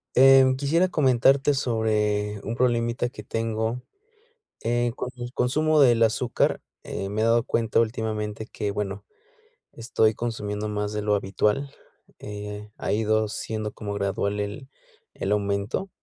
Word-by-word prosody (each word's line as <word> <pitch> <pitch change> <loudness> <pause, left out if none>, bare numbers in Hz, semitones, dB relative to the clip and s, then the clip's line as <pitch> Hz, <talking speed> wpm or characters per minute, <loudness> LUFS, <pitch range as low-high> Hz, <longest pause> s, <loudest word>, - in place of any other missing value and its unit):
Eh, 135 +1 +8
quisiera 165 +6 +2
comentarte 135 -2 +3
sobre 105 -4 0
un 115 - -3
problemita 120 -1 +1
que 115 -3 -10
tengo, 115 +2 -2 0.8
eh, 120 +1 +1
con 125 - -4
el 120 0 -6
consumo 155 +4 +2
del 120 -4 +5
azúcar, 115 +2 +1 0.2
eh, 95 0 -4
me 105 - -3
he - - +2
dado 115 0 +3
cuenta 115 -1 +1
últimamente 110 -1 -3
que, 105 -1 -3
bueno, 100 0 -4 0.7
estoy 110 -1 +1
consumiendo 105 -3 -3
más 105 0 -2
de 105 0 -2
lo 105 0 +2
habitual, 105 +7 0 0.5
eh, 105 0 -7
ha - - -3
ido 110 0 +1
siendo 110 +1 -4
como 105 -2 -6
gradual 100 0 -1
el 105 +7 -5 0.5
el 95 - -3
aumento, 100 - -1
110 Hz, 140 wpm, -25 LUFS, 105-120 Hz, 0.8 s, Eh